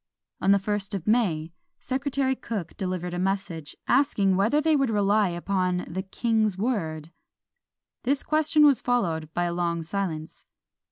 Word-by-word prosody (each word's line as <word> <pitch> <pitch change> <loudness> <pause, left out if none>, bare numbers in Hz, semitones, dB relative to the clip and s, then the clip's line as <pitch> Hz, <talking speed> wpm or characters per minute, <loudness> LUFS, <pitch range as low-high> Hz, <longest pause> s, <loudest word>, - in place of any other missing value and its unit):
On 195 - +4
the 200 - +6
first 200 0 -2
of 185 - -5
May, 180 -9 +1 0.3
Secretary 265 0 -1
Cooke 205 -9 -5
delivered 180 -2 -3
a 175 - -2
message, 185 -5 -2
asking 230 -8 +3
whether 215 +10 +3
they 310 +1 +3
would 275 -3 +2
rely 205 -1 +2
upon 180 +1 -1
the 190 +3 -3
king's 215 0 0
word? 165 -9 -2 0.9
This 275 +3 0
question 310 0 +3
was 280 -5 +4
followed 165 -11 0
by 175 - +1
a 175 0 -1
long 170 -1 -1
silence. 165 -3 -4
195 Hz, 150 wpm, -26 LUFS, 175-245 Hz, 0.9 s, the